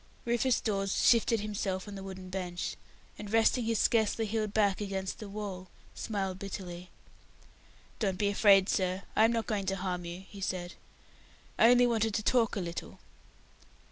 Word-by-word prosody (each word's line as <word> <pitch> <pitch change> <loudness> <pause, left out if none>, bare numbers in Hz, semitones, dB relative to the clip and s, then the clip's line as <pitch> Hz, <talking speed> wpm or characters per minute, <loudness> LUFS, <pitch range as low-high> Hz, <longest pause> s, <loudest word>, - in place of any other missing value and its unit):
Rufus 240 +1 +2
Dawes 195 -3 -1 0.2
shifted 230 -2 +4
himself 200 -2 -3
on 205 - -7
the 195 - -7
wooden 190 -1 -8
bench, 180 -2 -4 0.4
and 210 -1 -7
resting 225 +2 +3
his 230 0 +1
scarcely 225 +1 +2
healed 215 -1 -1
back 205 -2 +2
against 195 -2 -3
the 210 - -7
wall, 195 -3 -6 0.2
smiled 195 -3 -3
bitterly. 180 -3 -7 1.1
"Don't 195 -4 0
be 205 +1 +1
afraid, 200 -2 +5
sir; 185 -1 0
I 220 - +6
am 225 - +3
not 230 -2 -1
going 205 -4 -2
to 195 - +1
harm 180 -2 -3
you," 175 +2 -6
he 200 - -11
said. 180 -1 -3 0.9
"I 230 - +7
only 245 0 +6
wanted 225 -3 +1
to 215 - -1
talk 235 -2 +2
a - - -1
little." 170 -1 -6
200 Hz, 170 wpm, -31 LUFS, 190-220 Hz, 1.1 s, I